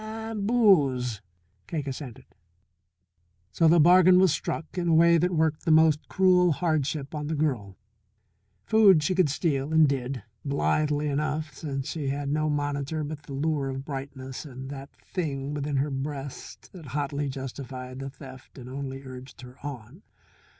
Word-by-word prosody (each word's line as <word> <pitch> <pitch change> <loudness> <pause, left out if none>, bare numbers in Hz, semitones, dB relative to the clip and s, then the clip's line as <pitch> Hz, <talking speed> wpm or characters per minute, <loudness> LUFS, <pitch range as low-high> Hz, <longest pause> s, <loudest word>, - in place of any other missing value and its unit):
"And 220 -1 -4
booze," 140 - +3 0.5
Cake 150 -4 -3
assented. 135 -3 -7 1.3
So 165 - +3
the 170 +2 +6
bargain 180 +3 +7
was 185 -2 +5
struck 155 +1 -4
in 175 -2 -1
a 165 - +4
way 170 +1 +6
that 180 +2 +2
worked 160 -3 0
the - - -2
most 155 -1 +4
cruel 180 -2 +4
hardship 150 -3 -1
on 150 -1 -4
the 160 - -1
girl. 125 -11 -2 0.9
Food 195 - +5
she 185 - +1
could 180 -4 +3
steal 145 -1 -1
and 160 -1 +6
did, 130 -1 -3 0.2
blithely 150 +1 0
enough, 150 +2 -2
since 135 -3 -5
she 150 -2 -3
had 140 +1 -2
no 155 +1 0
monitor 145 +1 -2
but 150 0 -6
the 145 - -10
lure 145 -1 -1
of 135 0 -5
brightness 135 -2 -6
and 135 -2 -8
that 135 0 -8 0.2
Thing 145 -5 -2
within 145 -1 -2
her 140 +2 0
breast 140 0 -6
that 170 -6 -11
hotly 145 0 -2
justified 130 -1 -7
the 135 0 -5
theft 130 -1 -13
and 125 -2 -9
only 135 0 -6
urged 130 0 -10
her 125 0 -13
on. 140 - -8
145 Hz, 160 wpm, -27 LUFS, 135-160 Hz, 1.3 s, bargain